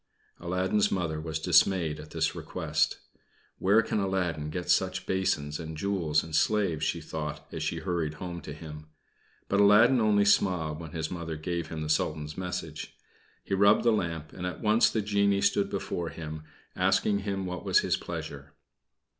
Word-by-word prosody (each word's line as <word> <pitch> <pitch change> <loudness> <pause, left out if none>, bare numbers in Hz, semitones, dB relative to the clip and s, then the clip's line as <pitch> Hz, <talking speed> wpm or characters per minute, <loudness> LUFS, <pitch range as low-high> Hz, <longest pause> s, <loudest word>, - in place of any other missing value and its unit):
Aladdin's 90 +4 +1
Mother 80 -4 -1
was 80 -1 -3
dismayed 80 -1 +3
at 75 0 -10
this 80 -1 0
request. - - -1 0.6
"Where 105 +4 +4
can 110 -1 -1
Aladdin 90 -6 -1
get 90 +3 -4
such - - +1
basins 90 -6 -1
and 80 -1 -6
jewels 85 -5 0
and 80 -1 -5
slaves?" 85 -2 +1
she - - 0
thought, 75 -1 -5
as - - -5
she - - -2
hurried 85 -5 -2
home 85 0 -6
to 75 - -8
him. 75 0 -9 0.6
But 100 - +1
Aladdin 110 +5 +6
only 105 -2 +3
smiled 85 -6 +2
when 80 -1 -9
his 80 -2 -3
Mother 85 -3 -4
gave 85 +2 -3
him 80 -1 -5
the - - -4
Sultan's 75 0 -1
message. 90 -4 -5 0.5
He - - -4
rubbed 100 +1 +5
the 120 - +4
lamp, 85 -7 -2
and 90 -1 -4
at 90 - -5
once 110 +1 +4
the 110 - -1
genie 100 -1 +2
stood - - +2
before 85 -1 -3
him, 80 -1 -7 0.3
asking 100 -1 +2
him 100 -1 -3
what 90 -1 -5
was - - +4
his - - +1
pleasure. 80 -4 -7
85 Hz, 170 wpm, -28 LUFS, 80-100 Hz, 0.6 s, Aladdin